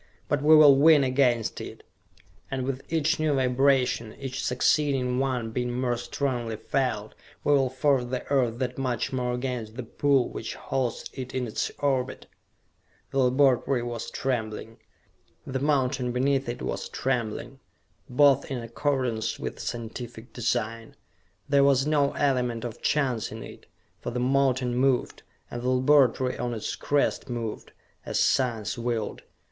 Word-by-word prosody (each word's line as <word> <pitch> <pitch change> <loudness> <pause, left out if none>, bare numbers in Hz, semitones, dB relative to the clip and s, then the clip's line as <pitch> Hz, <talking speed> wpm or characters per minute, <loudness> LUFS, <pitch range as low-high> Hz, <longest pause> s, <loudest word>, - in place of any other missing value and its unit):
But 145 -1 0
we 155 +2 +7
will 145 -3 +8
win 150 0 +6
against 130 -3 +1
it, - - -9 0.7
and 135 -1 -2
with 135 0 -3
each 160 +1 +1
new 155 -2 +1
vibration, 130 -3 +2
each 135 -1 -5
succeeding 125 -1 +1
one 125 -4 -1
being 125 +1 -2
more 125 -2 +1
strongly 120 -1 -2
felt, 110 -2 -2 0.3
we 145 - +3
will 135 -2 +3
force 130 0 +1
the 125 +1 -4
Earth 125 -4 +2
that 125 +1 -3
much 125 -2 -1
more 125 -1 -1
against 125 -3 -4
the 130 - -5
pull 135 +2 +2
which - - -6
holds 130 -3 -2
it 130 -1 -7
in 130 -1 -1
its 110 - -2
orbit!" 130 -3 -1 0.9
The 135 - 0
laboratory 130 -1 +3
was 120 -1 -5
trembling. 115 -3 -3 0.7
The 130 0 -3
mountain 130 -3 +1
beneath 135 +1 +1
it 120 - -5
was - - -3
trembling. 120 -5 -3 0.5
Both 140 +1 +4
in 135 - -2
accordance 120 -1 -1
with - - -6
scientific 115 0 -6
design. 115 -1 -2 0.5
There 140 -1 +4
was 135 -1 +4
no 145 -2 +2
element 125 -5 0
of 115 - -7
chance 130 -7 0
in - - -7
it, - - -12 0.3
for - - -5
the 125 +1 -3
mountain 130 -1 +1
moved, 130 0 +1 0.3
and 120 - -5
the 125 - -1
laboratory 130 -1 +3
on 120 -1 -2
its 110 - -4
crest 145 -1 0
moved, 115 -3 -5 0.3
as - - -2
science 120 -4 +1
willed. 115 -3 -2
125 Hz, 150 wpm, -26 LUFS, 120-135 Hz, 0.9 s, will